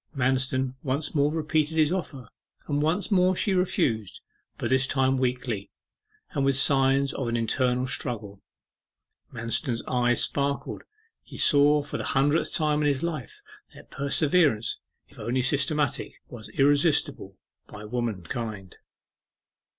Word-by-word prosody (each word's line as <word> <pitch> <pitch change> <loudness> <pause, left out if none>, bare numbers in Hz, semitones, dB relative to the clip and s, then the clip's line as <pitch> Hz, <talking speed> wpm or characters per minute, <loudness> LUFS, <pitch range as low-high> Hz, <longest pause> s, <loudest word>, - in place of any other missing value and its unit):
Manston 130 0 +1
once 140 +2 -2
more 145 -1 +2
repeated 155 0 0
his 155 0 +3
offer; 145 - -4 0.4
and 145 -1 0
once 175 +7 0
more 185 -1 +4
she 195 +2 0
refused, 115 - 0 0.4
but - - -3
this 130 0 +3
time 130 -1 +1
weakly, 125 -5 -2 0.6
and 145 -6 -1
with 135 -1 +2
signs 135 0 +3
of 130 - -3
an 115 0 0
internal 125 +2 0
struggle. 105 -7 -4 0.9
Manston's 115 +1 -1
eye 125 -1 +2
sparkled; 140 +3 -1 0.4
he - - -12
saw 145 0 +4
for 145 - -5
the - - -3
hundredth 145 +4 +2
time 150 -1 +1
in 150 - +2
his 140 0 0
life, 155 -8 -5 0.3
that - - -15
perseverance, 140 -3 +1 0.3
if - - -18
only 125 +2 -1
systematic, 140 +1 0
was 115 -3 -10
irresistible 140 - +2 0.3
by 105 +1 -10
womankind. 105 -3 -4
135 Hz, 130 wpm, -26 LUFS, 120-150 Hz, 0.9 s, more